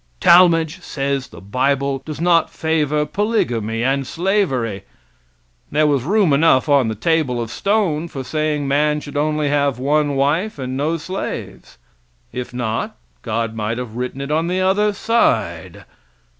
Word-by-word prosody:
Talmage 170 Hz, -1 st, +5 dB
says 140 Hz, -5 st, -2 dB
the -, -, -13 dB
bible 135 Hz, +6 st, 0 dB
does 155 Hz, -2 st, -7 dB
not 170 Hz, -1 st, +3 dB
favor 150 Hz, -2 st, 0 dB
polygamy 120 Hz, -, -1 dB
and 135 Hz, +1 st, 0 dB
slavery. 150 Hz, -, 0 dB, 0.9 s
There 155 Hz, +1 st, +3 dB
was 145 Hz, -3 st, +2 dB
room 190 Hz, -1 st, +2 dB
enough 140 Hz, -1 st, +4 dB
on 140 Hz, -4 st, +4 dB
the 110 Hz, -, -2 dB
table 145 Hz, 0 st, 0 dB
of 115 Hz, -1 st, -4 dB
stone 190 Hz, -, 0 dB
for 135 Hz, -5 st, -6 dB
saying 150 Hz, +1 st, -1 dB
man 150 Hz, +2 st, +2 dB
should 145 Hz, -, -10 dB
only 150 Hz, 0 st, 0 dB
have 140 Hz, -2 st, +1 dB
one 145 Hz, +2 st, +1 dB
wife 150 Hz, +10 st, 0 dB
and 130 Hz, -1 st, -4 dB
no 155 Hz, +5 st, 0 dB
slaves. 185 Hz, -, -6 dB, 0.6 s
If 125 Hz, -1 st, -5 dB
not, 125 Hz, -, -3 dB, 0.2 s
God 115 Hz, -1 st, -2 dB
might 110 Hz, +1 st, -3 dB
have 120 Hz, -3 st, -6 dB
written 125 Hz, +2 st, -4 dB
it 140 Hz, +1 st, -4 dB
on 160 Hz, +2 st, +1 dB
the 180 Hz, +1 st, -1 dB
other 195 Hz, +3 st, +2 dB
side. 230 Hz, +3 st, 0 dB
145 Hz, 150 wpm, -19 LUFS, 130-165 Hz, 0.9 s, Talmage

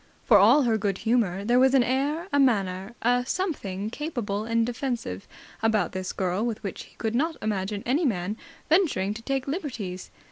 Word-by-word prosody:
For 210 Hz, -4 st, +7 dB
all 240 Hz, +9 st, +6 dB
her 225 Hz, -3 st, +1 dB
good 200 Hz, -2 st, -1 dB
humour, 205 Hz, -5 st, 0 dB
there 240 Hz, +3 st, +4 dB
was 265 Hz, +1 st, +5 dB
an 260 Hz, -, +5 dB
air, 285 Hz, +8 st, -1 dB
a 285 Hz, -, +4 dB
manner, 200 Hz, -4 st, +1 dB
a 245 Hz, +1 st, +3 dB
something 220 Hz, -, -3 dB
capable 235 Hz, -9 st, -3 dB
and 230 Hz, 0 st, +1 dB
defensive, 235 Hz, -, -4 dB, 0.3 s
about 220 Hz, -4 st, +2 dB
this 185 Hz, 0 st, -4 dB
girl 185 Hz, +2 st, -1 dB
with 230 Hz, -2 st, -3 dB
which 195 Hz, -, -5 dB
he -, -, -21 dB
could 220 Hz, -1 st, -2 dB
not 315 Hz, +6 st, 0 dB
imagine 205 Hz, -1 st, -2 dB
any 275 Hz, +8 st, +1 dB
man 205 Hz, -, 0 dB, 0.3 s
venturing 295 Hz, -, +2 dB
to 220 Hz, -, -8 dB
take 270 Hz, +2 st, -2 dB
liberties. 235 Hz, -, -4 dB
230 Hz, 180 wpm, -26 LUFS, 200-265 Hz, 0.3 s, For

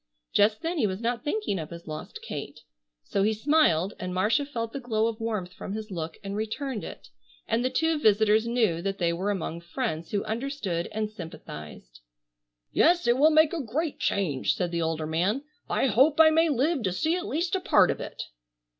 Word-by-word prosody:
Just 210 Hz, +7 st, +3 dB
then 335 Hz, 0 st, -1 dB
he 220 Hz, -, +3 dB
was 190 Hz, 0 st, -3 dB
not 235 Hz, +1 st, -2 dB
thinking 295 Hz, -, -1 dB
of 155 Hz, -, -6 dB
his 170 Hz, 0 st, -9 dB
lost 155 Hz, 0 st, -7 dB
Kate. -, -, -6 dB, 0.4 s
So 195 Hz, -, -1 dB
he 215 Hz, +2 st, +3 dB
smiled 215 Hz, -, +3 dB
and 180 Hz, 0 st, -4 dB
Marcia 225 Hz, +10 st, +2 dB
felt 230 Hz, -5 st, -4 dB
the 275 Hz, -, -3 dB
glow 225 Hz, -4 st, 0 dB
of 230 Hz, 0 st, -2 dB
warmth 210 Hz, -6 st, -3 dB
from 195 Hz, -, -6 dB
his 215 Hz, 0 st, -6 dB
look 160 Hz, -3 st, -5 dB
and 200 Hz, 0 st, -4 dB
returned 220 Hz, +3 st, -3 dB
it, -, -, -9 dB, 0.4 s
and 235 Hz, -, +1 dB
the 255 Hz, -, +1 dB
two 320 Hz, +2 st, +1 dB
visitors 220 Hz, -1 st, +4 dB
knew 225 Hz, -9 st, +1 dB
that 195 Hz, +1 st, -2 dB
they 170 Hz, -3 st, +1 dB
were 185 Hz, +4 st, -2 dB
among 170 Hz, -4 st, -3 dB
friends 170 Hz, -3 st, -3 dB
who 200 Hz, -1 st, -1 dB
understood 220 Hz, -7 st, -3 dB
and 215 Hz, 0 st, -2 dB
sympathized. 75 Hz, -, -10 dB, 0.7 s
"Yes, 345 Hz, +2 st, +4 dB
it 240 Hz, -, +4 dB
will 305 Hz, +2 st, +7 dB
make 315 Hz, 0 st, +4 dB
a 335 Hz, -, -1 dB, 0.4 s
change," 160 Hz, -10 st, 0 dB
said 180 Hz, -2 st, -2 dB
the 170 Hz, -1 st, -1 dB
older 160 Hz, -1 st, -1 dB
man. 180 Hz, -, 0 dB, 0.3 s
"I -, -, +1 dB
hope 270 Hz, +6 st, +4 dB
I 315 Hz, -1 st, +8 dB
may 325 Hz, +1 st, +4 dB
live 290 Hz, +2 st, +1 dB
to 190 Hz, -4 st, 0 dB
see 315 Hz, -, 0 dB
at 365 Hz, +2 st, -3 dB
least 340 Hz, +1 st, -1 dB
a 380 Hz, -, +2 dB
part -, -, +5 dB
of -, -, -4 dB
it." -, -, -6 dB
215 Hz, 200 wpm, -27 LUFS, 180-275 Hz, 0.7 s, I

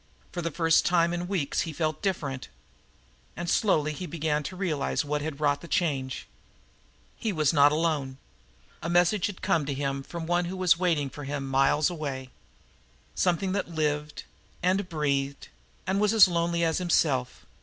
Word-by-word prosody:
For 175 Hz, -, -4 dB
the 165 Hz, -, -1 dB
first 165 Hz, +1 st, +3 dB
time 170 Hz, -1 st, +2 dB
in 175 Hz, 0 st, -3 dB
weeks 175 Hz, -8 st, -1 dB
he 165 Hz, -, -3 dB
felt 155 Hz, 0 st, -2 dB
DIFFERENT. 145 Hz, -10 st, -2 dB, 0.9 s
And 175 Hz, -, -5 dB
slowly 155 Hz, -6 st, +2 dB
he 180 Hz, +4 st, -6 dB
began 155 Hz, -2 st, -1 dB
to 185 Hz, +6 st, -6 dB
realize 165 Hz, -5 st, -1 dB
what 150 Hz, 0 st, -1 dB
had 150 Hz, -1 st, -5 dB
wrought 145 Hz, -1 st, +1 dB
the 170 Hz, -, -10 dB
change. 135 Hz, -7 st, -1 dB, 0.9 s
He 220 Hz, -, -2 dB
was 155 Hz, -4 st, +1 dB
not 145 Hz, -1 st, +6 dB
alone. 150 Hz, -4 st, -1 dB, 0.6 s
A 170 Hz, -, -3 dB
message 175 Hz, +2 st, +3 dB
had 205 Hz, -3 st, -9 dB
come 160 Hz, -, +2 dB
to 140 Hz, -, -2 dB
him 140 Hz, 0 st, -2 dB
from 170 Hz, +4 st, -7 dB
the -, -, -9 dB
one 175 Hz, 0 st, +2 dB
who 185 Hz, +2 st, -5 dB
was 180 Hz, -2 st, +3 dB
waiting 160 Hz, -7 st, +1 dB
for 145 Hz, -, -8 dB
him 140 Hz, -1 st, -3 dB
miles 135 Hz, +5 st, +3 dB
away; 135 Hz, -6 st, -5 dB, 0.8 s
something 185 Hz, +1 st, +1 dB
that 195 Hz, 0 st, -1 dB
lived, 150 Hz, -2 st, -2 dB, 0.4 s
and 185 Hz, +1 st, +1 dB
breathed, 140 Hz, -3 st, -1 dB, 0.4 s
and 190 Hz, +2 st, 0 dB
was 210 Hz, +1 st, +3 dB
as 210 Hz, -3 st, +9 dB
lonely 170 Hz, -1 st, 0 dB
as 165 Hz, 0 st, +1 dB
himself. 140 Hz, -8 st, 0 dB
160 Hz, 175 wpm, -27 LUFS, 145-175 Hz, 0.9 s, as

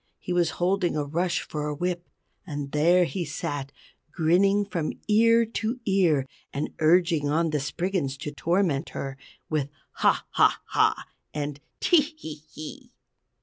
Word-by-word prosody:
He 180 Hz, -, -4 dB
was 175 Hz, -1 st, +3 dB
holding 180 Hz, -2 st, +1 dB
a 150 Hz, -, +1 dB
rush 170 Hz, +4 st, 0 dB
for 150 Hz, -1 st, -3 dB
a 150 Hz, -, -2 dB
whip. 175 Hz, +2 st, -3 dB, 0.3 s
And 145 Hz, -5 st, -5 dB
there 170 Hz, +5 st, +4 dB
he 180 Hz, +1 st, -3 dB
sat 145 Hz, -2 st, -4 dB, 0.4 s
grinning 190 Hz, +5 st, +3 dB
from 170 Hz, -6 st, -2 dB
ear 230 Hz, +2 st, +5 dB
to 225 Hz, +2 st, -3 dB
ear, 175 Hz, -9 st, +3 dB, 0.3 s
and 140 Hz, -, -3 dB
urging 165 Hz, -2 st, +3 dB
on 160 Hz, +2 st, +1 dB
the 150 Hz, -, +1 dB
Spriggans 150 Hz, -1 st, -2 dB
to 145 Hz, +2 st, -5 dB
torment 170 Hz, -1 st, 0 dB
her, 135 Hz, -1 st, -4 dB, 0.3 s
with 150 Hz, -3 st, -1 dB, 0.2 s
"Haw! -, -, +2 dB
Haw! -, -, +4 dB
Haw!" -, -, +2 dB, 0.3 s
and 145 Hz, -1 st, -3 dB, 0.2 s
"Tee! 345 Hz, -4 st, +5 dB, 0.2 s
Hee! 155 Hz, -, -8 dB
Hee!" 245 Hz, -, -9 dB
170 Hz, 150 wpm, -26 LUFS, 150-190 Hz, 0.4 s, ear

